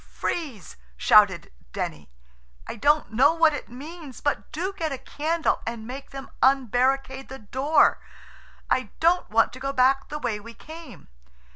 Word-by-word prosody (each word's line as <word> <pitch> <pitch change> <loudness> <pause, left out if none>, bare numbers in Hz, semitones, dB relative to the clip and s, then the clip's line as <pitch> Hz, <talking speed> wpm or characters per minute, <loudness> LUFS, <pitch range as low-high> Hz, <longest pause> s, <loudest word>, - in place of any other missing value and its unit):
"Freeze," 270 - -4 0.2
shouted 190 - +4 0.2
Denny. 75 -3 -5 0.6
"I - - -6
don't 295 0 +2
know 280 +8 +4
what 325 -2 +4
it - - -6
means 290 +2 -10
but 290 - -2
do 370 +5 -3
get 325 -5 -3
a 270 - -3
candle 315 +5 -1
and 230 -1 -5
make 265 +4 -8
them 270 0 -9
unbarricade 265 +1 +2
the 265 - -7
door. 270 +7 +2 0.7
I 255 -5 0
don't 345 +2 +2
want 225 +1 +3
to 255 - -9
go 275 +1 -2
back 270 +1 +2
the 300 - -4
way 235 -7 -2
we 230 +2 -12
came." 320 +1 -12
270 Hz, 155 wpm, -25 LUFS, 240-305 Hz, 0.7 s, shouted